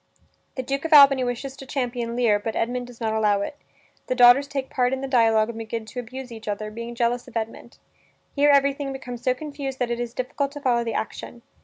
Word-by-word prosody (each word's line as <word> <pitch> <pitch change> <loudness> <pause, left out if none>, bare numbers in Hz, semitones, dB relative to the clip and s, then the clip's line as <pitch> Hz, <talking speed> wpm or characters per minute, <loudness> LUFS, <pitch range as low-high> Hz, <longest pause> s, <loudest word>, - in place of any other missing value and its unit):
The 260 - -3
Duke 275 +2 -3
of 325 - 0
Albany 275 -3 +8
wishes 250 +2 -4
to 270 - -9
champion 245 -3 -3
Lear, 230 -4 +3
but 220 +2 -4
Edmund 245 +1 -2
does 245 -2 -14
not 220 -2 -1
allow 210 -2 +2
it. 245 - -4 0.5
The 255 - 0
daughters 250 +3 +7
take 275 -1 -4
part 250 0 +1
in 265 - -2
the 270 - -3
dialog 225 -4 +3
and 230 - -6
begin 225 0 -5
to 235 +4 -7
abuse 250 +1 -8
each 220 -1 -10
other, 215 +1 -3
being 235 +2 -7
jealous 240 +1 0
of 235 - -5
Edmund. 225 +2 -6 0.6
Here 290 0 +4
everything 280 0 +2
becomes 245 -3 -7
so 255 0 +1
confused 280 -2 -6
that 245 -2 -1
it 235 - -2
is 240 0 -4
difficult 275 +2 -2
to 290 - -7
follow 245 -4 +1
the 230 - -3
action. 235 +2 -5
245 Hz, 225 wpm, -24 LUFS, 230-270 Hz, 0.6 s, Albany